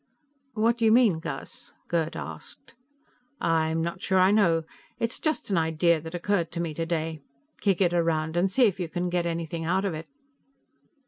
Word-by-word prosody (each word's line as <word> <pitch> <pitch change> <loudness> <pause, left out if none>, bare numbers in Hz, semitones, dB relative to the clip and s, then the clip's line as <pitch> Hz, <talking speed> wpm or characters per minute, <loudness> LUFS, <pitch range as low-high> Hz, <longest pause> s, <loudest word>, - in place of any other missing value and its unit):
"What 230 +2 +2
do 230 - +2
you 220 - +5
mean, 225 -8 +5
Gus?" 240 +8 -7
Gerd 165 -2 -1
asked. - - -9 0.7
"I'm 160 -1 +1
not 170 +2 -4
sure 190 - +1
I 185 +1 +5
know. 170 -6 +3 0.3
It's 230 +1 -2
just 310 -8 -1
an 190 - +3
idea 160 0 +2
that 160 +2 -7
occurred 175 -1 0
to 170 - -3
me 170 -2 -2
today. 160 -1 -2 0.4
Kick 195 -3 +1
it 175 -2 +3
around 165 -2 0
and 180 +3 +2
see 250 +6 +4
if 195 -4 0
you 175 -3 -3
can 175 +1 -2
get 175 -1 0
anything 165 -1 -3
out 185 +4 +1
of 195 - -1
it." 155 +1 -7
170 Hz, 185 wpm, -27 LUFS, 165-195 Hz, 0.7 s, you